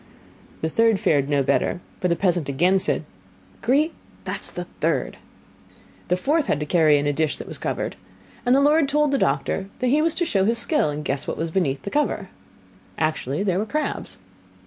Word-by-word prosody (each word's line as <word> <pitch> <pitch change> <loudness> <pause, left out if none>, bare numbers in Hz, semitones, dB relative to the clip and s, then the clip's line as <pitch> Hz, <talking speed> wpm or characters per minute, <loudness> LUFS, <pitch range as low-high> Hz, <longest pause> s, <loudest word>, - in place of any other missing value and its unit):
The 160 - 0
third 225 +2 +3
fared 140 -2 +2
no 140 -2 +2
better, 175 - +1 0.2
for 180 - +1
the 170 - +2
peasant 175 -6 0
again 175 +8 +3
said: 180 - -1 0.6
'Grete, 285 +7 +2 0.3
that - - -4
is - - -11
the - - -5 0.2
third.' - - 0 0.9
The 180 - +1
fourth 295 - +1
had 145 - +1
to 150 - -2
carry 155 -2 +4
in 145 - -1
a 145 - +1
dish 155 0 0
that - - -7
was - - -8
covered, - - -3 0.5
and 245 +1 +4
the 275 - +4
lord 295 0 +4
told 300 0 +2
the 275 - +1
doctor 140 +7 0
that 255 - 0
he 295 +4 +3
was 325 0 +1
to 345 - +1
show 195 -10 +1
his 230 +3 +2
skill, 235 - +1
and 150 +1 -5
guess 135 0 -2
what - - -3
was 165 0 -2
beneath 140 -7 0
the 200 - -5
cover. 295 0 0 0.7
Actually, 155 +1 -1
there 190 -2 +1
were 210 - -1
crabs. 305 +4 -3
185 Hz, 205 wpm, -23 LUFS, -, 0.9 s, carry